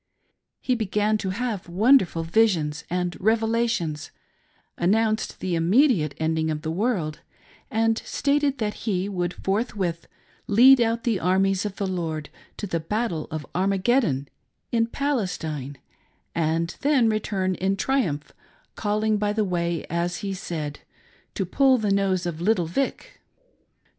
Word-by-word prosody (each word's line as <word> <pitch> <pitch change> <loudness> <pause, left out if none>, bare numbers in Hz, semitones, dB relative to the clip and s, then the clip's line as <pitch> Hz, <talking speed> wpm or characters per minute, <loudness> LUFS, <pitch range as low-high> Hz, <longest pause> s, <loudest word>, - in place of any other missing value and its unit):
He 255 - 0
began 215 -1 0
to 190 - -2
have 210 -2 -3
wonderful 190 -3 +4
visions 165 -5 +1
and 180 0 -1
revelations, 225 -7 0 0.7
announced 215 +4 +1
the 185 - -2
immediate 170 - +3
ending 160 0 0
of 155 0 -3
the 160 - -2
world, 180 -5 -1 0.5
and 225 0 +1
stated 280 -1 +1
that 210 -2 -1 0.2
he 190 -1 0
would 180 -3 -2
forthwith 195 -4 -2 0.4
lead 250 +5 +7
out 230 0 +1
the 225 -5 +1
armies 190 +2 +2
of 200 - -8
the 200 - -2
Lord 165 -5 -3 0.3
to - - -4
the 170 -4 -2
battle 175 -2 -2
of 155 -1 -5
Armageddon, 190 - +1 0.4
in 230 -1 +2
Palestine, 180 - -2 0.6
and 165 +1 0
then 275 -5 +3
return 200 -3 0
in 190 +2 -1
triumph, 195 - -1 0.4
calling 215 0 0
by 205 0 0
the 215 -1 +1
way, 170 -3 -1
as 170 +1 -1
he 195 - -2
said, 155 -6 -5 0.3
" - - -33
to 195 - -1
pull 260 +7 +4
the 210 -3 0
nose 190 -2 +1
of 170 -2 -4
little 190 -2 +2
Vic. 275 - -3
195 Hz, 140 wpm, -24 LUFS, 170-225 Hz, 0.7 s, lead